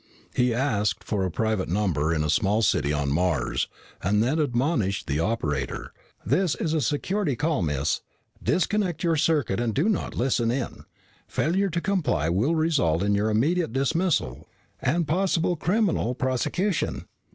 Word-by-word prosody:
He 125 0 +2
asked 115 -4 0
for 100 -3 -1
a - - -1
private 110 0 -1
number 85 -6 +1
in 80 -2 +1
a 75 - -1
small 105 +6 +2
city 75 -6 +2
on 70 -2 0
Mars, 75 -5 0 0.3
and 105 +4 +2
then 145 +7 +1
admonished 125 - 0
the 75 -1 -1
operator, 80 -8 -2 0.3
"This 185 -4 +2
is 160 - -2
a 160 - +1
security 150 - 0
call, 150 -1 0
miss. 75 -2 0 0.4
Disconnect 185 -3 0
your 165 -2 +2
circuit 145 -10 +1
and 120 -2 -1
do 155 +9 +2
not 215 -5 -1
listen 120 -2 +1
in. 125 +1 -3 0.4
Failure 190 +5 +1
to 170 0 -1
comply 145 - 0
will 110 - +1
result 140 - +2
in 100 0 +2
your 105 +2 +1
immediate 145 +7 +1
dismissal 140 - 0 0.3
and 155 +5 +1
possible 175 +1 +1
criminal 175 - +1
prosecution." 155 - -1
125 Hz, 150 wpm, -25 LUFS, -, 0.4 s, He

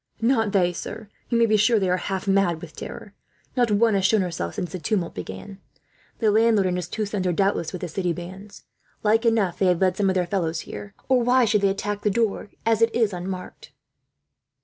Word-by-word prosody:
"Not 225 -2 +2
they, 180 -3 +2
sir. 215 +4 -7 0.2
You 235 - +2
may 230 - +5
be 215 -1 +3
sure 225 +2 +4
they 195 -3 +1
are 180 0 +2
half 190 +1 -4
mad 195 -4 +2
with - - -11
terror. - - -8 0.4
Not 245 -2 +2
one 215 +2 +3
has 195 -1 +1
shown 210 +2 +4
herself, 165 - -3
since 180 - -4
the 185 - -5
tumult 185 -1 -1
began. 95 - -8 0.6
The 220 -3 +2
landlord 220 -2 +4
and 180 -1 0
his 180 -1 -3
two 215 - -3
sons 200 -2 -2
are, - - +2
doubtless, 195 -2 0
with 180 - -6
the 180 - -3
city 180 +2 -2
bands. 185 +4 -9 0.4
Like 225 +2 +3
enough 215 -6 +1
they 190 - +3
have 180 -2 +2
led 185 -1 +2
some 200 -2 +2
of 190 - 0
their 180 -1 +1
fellows 170 -3 -1
here, 105 -1 -9
or 260 -2 +3
why 250 +1 +4
should 210 -2 +2
they 200 - +3
attack 205 +1 -3
the 210 - +1
door, 210 -1 -1 0.2
as 225 -1 +2
it 230 0 +3
is 225 -4 +2
unmarked?" 185 +1 -7
195 Hz, 225 wpm, -24 LUFS, 180-220 Hz, 0.6 s, may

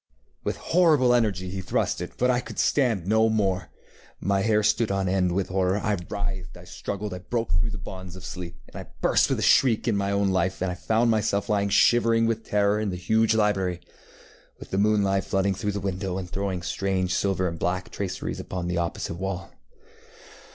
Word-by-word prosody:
With - - -2 0.2
horrible 155 -8 +5
energy 100 -7 +1
he 95 0 -4
thrust - - -1
itŌĆöbut 125 - -1
I 120 - +2
could - - -9
stand 115 - +2
no 110 +3 +3
more. 95 -6 0 0.5
My 100 +1 +1
hair 105 0 +2
stood 110 +2 +2
on 95 -1 0
end 90 -1 +1
with 95 +1 -1
horror. 95 +1 +1
I 105 0 0 0.2
writhed, 95 -3 -4
I 90 - -12
struggled, 100 +2 -5
I 90 - -5
broke 115 +4 -3
through 85 +7 +1
the 105 - -5
bonds 95 -1 -8
of 95 - -10
sleep, 90 -1 -7
and - - -18
I - - -8
burst - - +3
with - - +1
a - - -2
shriek 125 -3 +4
into 105 -4 +2
my 100 0 -1
own 100 0 +2
life, 95 0 0
and 90 -1 -1
found 115 +5 +1
myself 105 -2 0
lying 100 -1 +1
shivering 115 +3 +4
with 115 -1 -1
terror 105 0 +1
in 110 -1 -1
the 90 - -3
huge 110 +5 +2
library, 95 -5 +1 0.8
with - - -12
the 95 - 0
moonlight 100 -2 +2
flooding 95 0 +1
through 105 +1 -3
the 100 - -2
window 95 -1 -3
and 95 -2 -4
throwing 95 -1 -3
strange 95 0 -1
silver 95 -1 +1
and 85 -1 -5
black 90 +1 -2
traceries 95 -2 -4
upon 90 -2 -4
the 90 -1 -1
opposite 85 -1 -3
wall. 95 -1 -4
100 Hz, 200 wpm, -25 LUFS, 95-110 Hz, 0.8 s, horrible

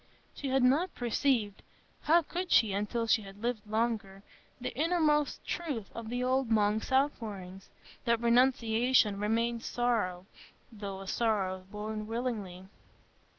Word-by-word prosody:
She 280 - -5
had 265 -1 +2
not 295 +9 +3
perceived—how 245 - 0
could 355 +4 -4
she 220 -4 +5
until 210 +4 -1
she 225 0 +3
had 200 +1 -12
lived 235 -3 -2
longer?—the 215 +1 -4
inmost 305 -1 +1
truth 280 - -4
of 230 -1 -7
the 245 +1 -2
old 260 -1 +1
monk's 215 0 +1
out 275 +2 +3
pourings, 195 -4 -8 0.4
that 235 -1 +2
renunciation 235 -2 +3
remains 230 +2 0
sorrow, 215 -7 0 0.5
though 200 -3 -6
a 195 - -9
sorrow 190 -5 0
borne 215 +1 -5
willingly. 220 -6 -4
230 Hz, 125 wpm, -31 LUFS, 205-255 Hz, 0.5 s, she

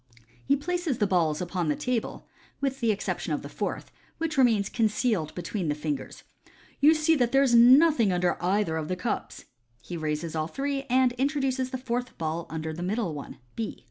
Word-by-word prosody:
'* 120 +1 -31
He 280 - +4
places 330 -1 -2
the 210 - +2
balls 170 -5 +1
upon 175 -1 -2
the 150 - +1
table, 250 -3 -3 0.3
with 270 -1 -2
the 230 -3 +2
exception 205 - -2
of - - -3
the - - -6
fourth, - - -4 0.3
which 325 -1 -2
remains 230 -7 +3
con 225 -2 +1
cealed 210 -7 -1
between 180 +1 -3
the 150 - 0
fingers. 150 -2 -5 0.6
u 290 - +6
You 320 - +6
see 310 +1 +3
that 245 -3 +1
there 270 +1 +5
is 255 -3 +2
nothing 250 - +6
under 180 -1 +1
either 185 -3 +1
of 155 -1 -3
the 185 - -1
cups." 180 +6 -4 0.3
He 175 - -8
raises 155 +1 -3
all 155 0 -1
three, 275 +6 -3
and 255 0 +4
introduces 270 -2 0
the 260 - -3
fourth 250 0 -4
ball 160 +1 -3
under 160 0 -4
the 170 - -7
middle 190 -1 -1
one 145 -2 -8 0.2
(B). 225 -2 -4
220 Hz, 205 wpm, -27 LUFS, 165-265 Hz, 0.6 s, u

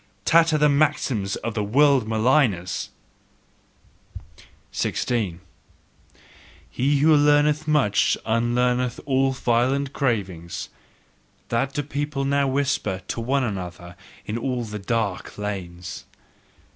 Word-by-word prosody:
Tatter 165 -1 +4
the 150 0 +4
maxims 140 -9 +1
of 115 - -4
the 105 -2 -1
world 135 +2 +3
maligners! 110 - +1 1.8
16. 105 -9 -1 1.3
"He 140 +3 +1
who 155 +1 +6
learneth 145 +1 +3
much 140 -10 +2
unlearneth 120 +2 +1
all 135 -1 +2
violent 130 +2 0
cravings" 95 - -2 0.8
that 125 +4 0
do 145 - -2
people 145 0 -3
now 140 0 +2
whisper 130 -8 -1
to 115 - -3
one 135 +3 +1
another 90 -5 -5 0.3
in 110 +2 -3
all 125 -1 -2
the 105 -1 -6
dark 105 -2 -2
lanes. 90 -4 -6
125 Hz, 105 wpm, -23 LUFS, 105-140 Hz, 1.8 s, who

